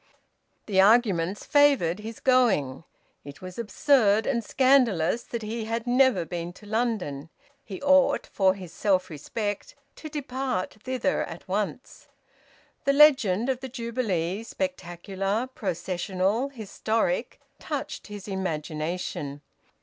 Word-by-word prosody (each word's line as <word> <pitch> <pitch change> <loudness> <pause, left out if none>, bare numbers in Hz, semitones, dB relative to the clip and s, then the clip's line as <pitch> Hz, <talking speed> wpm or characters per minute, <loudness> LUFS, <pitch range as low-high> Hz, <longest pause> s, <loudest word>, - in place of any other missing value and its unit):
The 190 -3 +3
arguments 200 -4 +3
favoured 275 - +3
his 220 +1 -8
going. 195 - +2 0.4
It 140 0 -11
was 185 +3 -9
absurd 220 -1 +3
and 235 -4 0
scandalous 240 -7 +3
that 235 -2 -6
he 220 +1 -4
had 230 +1 -3
never 245 -7 +3
been 170 +1 -5
to 210 - -16
London: 205 - -2 0.3
he 195 -7 -8
ought 280 -1 +4
for 190 -1 +2
his 180 -4 -10
self 190 -2 +1
respect 205 +7 -4 0.2
to 310 - -8
depart 260 -9 -3
thither 255 -1 -1
at 165 0 -10
once. 205 +6 -4 0.8
The 275 - +3
legend 260 -8 +5
of 260 -2 0
the 265 0 -7
Jubilee, 225 -7 -2
spectacular, 195 -3 -3
processional, 190 +5 -1
historic, 230 - -2 0.2
touched - - -5
his 205 -2 -9
imagination. 155 -5 -4
210 Hz, 120 wpm, -26 LUFS, 185-250 Hz, 0.8 s, legend